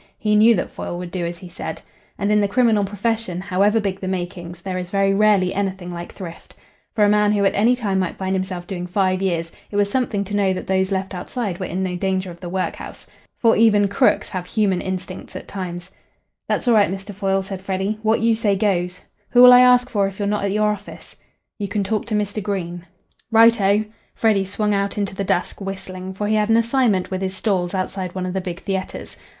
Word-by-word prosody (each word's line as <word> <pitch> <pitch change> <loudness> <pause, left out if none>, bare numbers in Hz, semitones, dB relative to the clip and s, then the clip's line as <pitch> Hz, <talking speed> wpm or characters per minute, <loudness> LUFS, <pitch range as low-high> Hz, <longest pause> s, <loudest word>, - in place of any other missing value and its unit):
He 210 -1 +1
knew 225 +2 +6
that - - -3
Foyle 175 - -5
would 175 -1 -6
do 175 -2 -2
as 170 0 -6
he 180 - -11
said. 175 - -7 0.3
And 200 +1 0
in 210 0 +4
the 205 - +2
criminal 225 -1 +3
profession, 205 -2 -2
however 200 +3 +2
big 195 -2 -2
the 190 - -5
makings, 175 -2 -4
there 185 -1 -3
is 180 -1 -6
very 195 0 +2
rarely 200 -3 +3
anything 190 -3 -3
like 170 0 -7
thrift. 170 -3 -10 0.4
For 215 - +3
a - - +4
man 210 0 +3
who 200 -1 +2
at 195 - +3
any 230 +5 +3
time 205 -6 -1
might 185 -2 -2
find 190 0 -1
himself 185 -2 -3
doing 180 -1 -5
five 185 0 +1
years, 170 -3 -1 0.2
it - - -8
was 205 0 +2
something 225 -5 0
to 205 +1 -5
know 195 -2 +2
that 185 - -5
those 190 0 0
left 190 0 -2
outside 185 +1 -4
were 185 - -3
in 190 +2 -2
no 180 -1 -2
danger 190 0 -1
of 170 - -12
the 175 - -7
workhouse. 185 +1 -4 0.3
For 230 -1 +4
even 210 -2 +4
"crooks" 200 - +2
have 180 -1 -5
human 195 -4 +1
instincts 185 0 -6
at - - -7
times. 180 -1 -6 0.6
"That's - - -1
all 240 - +5
right, 210 -4 +4
Mr. 195 +2 -6
Foyle," 195 0 0
said 190 -1 -7
Freddy. 195 +2 -2
"What 220 0 +2
you 230 0 +3
say 220 -3 +1
goes. 180 -3 0 0.3
Who'll 250 0 +9
I 245 - +9
ask 250 0 +6
for 200 -5 +1
if 195 0 -8
you're 205 - -1
not 205 0 0
at 200 - 0
your 210 +1 +2
office?" 205 -1 -9 0.4
"You 205 - -2
can 200 +1 -1
talk 215 +2 -2
to 220 - -1
Mr. 210 0 -1
Green." 180 -3 -4 0.4
"Right 230 0 +6
oh." 200 +2 +3 0.3
Freddy 210 -4 +2
swung 210 +2 -1
out 200 0 -1
into 200 -2 -1
the 195 - -3
dusk, 180 +1 -1
whistling, 190 -1 -6
for 205 - -3
he 215 - +1
had 210 0 +1
an 225 - +5
assignment 230 -5 +1
with 185 0 -2
his 190 0 -2
"stalls" 185 -3 -1
outside 185 -1 -3
one 185 -1 -2
of 180 - -3
the 190 - -1
big 180 0 -6
theatres. 190 -1 -4
195 Hz, 230 wpm, -21 LUFS, 185-210 Hz, 0.6 s, Who'll